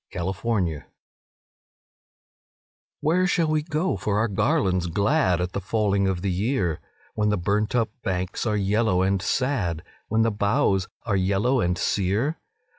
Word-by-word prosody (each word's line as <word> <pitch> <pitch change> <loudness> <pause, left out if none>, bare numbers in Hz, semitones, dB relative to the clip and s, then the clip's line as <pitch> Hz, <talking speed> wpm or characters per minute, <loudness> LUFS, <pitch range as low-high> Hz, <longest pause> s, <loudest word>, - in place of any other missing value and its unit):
A - - -4
Song 90 +1 -1
of 95 +1 -6
Autumn 90 -10 0 2.2
"Where 180 +4 +2
shall 165 -2 +1
we 155 0 +2
go 155 - -1
for 100 +2 -1
our 110 +2 +2
garlands 95 -3 +1
glad 100 - +2
At 90 0 -2
the 100 - -3
falling 100 0 +1
of 95 -1 -2
the 100 - 0
year, 95 - 0 0.3
When 105 -1 +1
the 105 - +1
burnt 105 +6 0
up 115 -3 +1
banks 95 +3 -2
are 105 -1 +1
yellow 100 -1 +2
and 95 0 +1
sad, 100 - -1 0.2
When 110 +1 +2
the 115 - +2
boughs 100 -2 +1 0.2
are 105 -4 0
yellow 100 +7 +1
and 90 +1 0
sere? 105 - 0
100 Hz, 160 wpm, -24 LUFS, 95-115 Hz, 2.2 s, Where